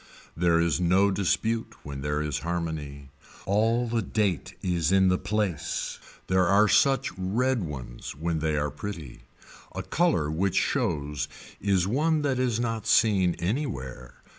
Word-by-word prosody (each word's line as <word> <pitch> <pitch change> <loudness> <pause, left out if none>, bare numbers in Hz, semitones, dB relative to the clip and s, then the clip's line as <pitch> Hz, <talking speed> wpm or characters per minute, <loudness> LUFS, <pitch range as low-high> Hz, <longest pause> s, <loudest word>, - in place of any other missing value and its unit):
There 85 0 +3
is 85 +1 +1
no 95 +3 +4
dispute 110 +4 0
when 70 -2 -6
there 75 +1 -1
is 75 -3 -2
harmony. 80 -5 -4 0.3
All 115 +5 +2
the 115 0 0
date 100 -4 -1
is 85 -3 +1
in 95 -1 +5
the 90 - +2
place. 105 -7 -2 0.3
There 95 -1 +2
are 100 +3 +5
such 135 +6 +3
red 120 +7 +1
ones 65 -7 -6
when 80 +2 -2
they 75 -1 0
are 75 0 -1
pretty. 85 -11 -7 0.5
A - - -3
color 155 - +1
which 95 +4 0
shows 75 0 0 0.3
is 95 -3 +2
one 150 +8 +1
that 135 -3 0
is 120 -3 +1
not 115 -2 -2
seen 95 -6 +4
anywhere. 75 - -4
90 Hz, 145 wpm, -27 LUFS, 75-110 Hz, 0.5 s, in